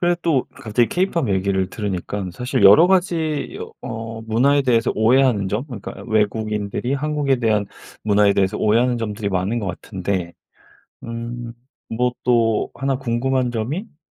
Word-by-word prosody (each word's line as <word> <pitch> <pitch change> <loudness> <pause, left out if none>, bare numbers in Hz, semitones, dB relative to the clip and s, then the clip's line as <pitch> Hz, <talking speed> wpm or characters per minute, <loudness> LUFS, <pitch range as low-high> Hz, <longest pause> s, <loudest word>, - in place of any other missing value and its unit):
그래도 175 0 +2
또 150 -7 +1
갑자기 115 +2 +1
케이팝 175 - 0
얘기를 95 -1 0
들으니깐 100 -1 -4
사실 125 +3 -1
여러 150 - +8
가지 170 -5 0 0.3
어 115 0 -6
문화에 130 +6 +2
대해서 115 -3 +2
오해하는 115 -2 +3
점 110 +7 -2
그러니까 120 -9 -8
외국인들이 110 +2 -1
한국에 145 -1 0
대한 110 -4 +1 0.4
문화에 105 -1 +4
대해서 100 +2 +1
오해하는 120 +3 +2
점들이 105 -2 -3
많은 95 +5 -1
것 100 - -4
같은데. 95 -1 -3 0.7
음. 115 0 -6 0.4
뭐 125 +2 +1
또 115 -3 +2
하나 135 0 -1
궁금한 130 0 0
점이 120 +9 -2
음 205 -8 -13
115 Hz, 335 characters per minute, -21 LUFS, 105-135 Hz, 0.7 s, 여러